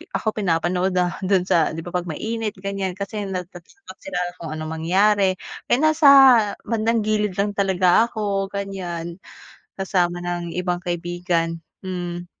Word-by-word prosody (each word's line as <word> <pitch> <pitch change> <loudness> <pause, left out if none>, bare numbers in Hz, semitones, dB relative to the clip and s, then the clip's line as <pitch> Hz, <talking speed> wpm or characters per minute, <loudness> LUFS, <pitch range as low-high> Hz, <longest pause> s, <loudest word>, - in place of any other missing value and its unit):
ako 220 - 0
pinapanood 180 0 0
dahil 180 -1 +1
do'n 190 -1 +3
sa 165 -2 +3
'di 165 - -5
ba, - - -5
'pag 180 0 -1
mainit 220 +5 -3
ganiyan 195 -1 -3
kasi 205 +1 -4
natatakot 185 - -8
sila 290 -10 -5 0.2
kung 165 - -6
anong 155 0 -5
mangyari, 195 +2 +3 0.4
eh, 245 - +3
nasa 310 -1 +4 0.6
bandang 230 0 +1
gilid 210 -2 0
lang 205 +1 +2
talaga 190 +2 +4
ako 200 -3 -1
ganiyan, 175 -4 -5 0.6
kasama 175 -2 0
ng 175 -1 -4
ibang 180 -1 -1
kaibigan, 175 -1 -2 0.3
hmm. 175 -1 -4
185 Hz, 140 wpm, -22 LUFS, 175-205 Hz, 0.6 s, nasa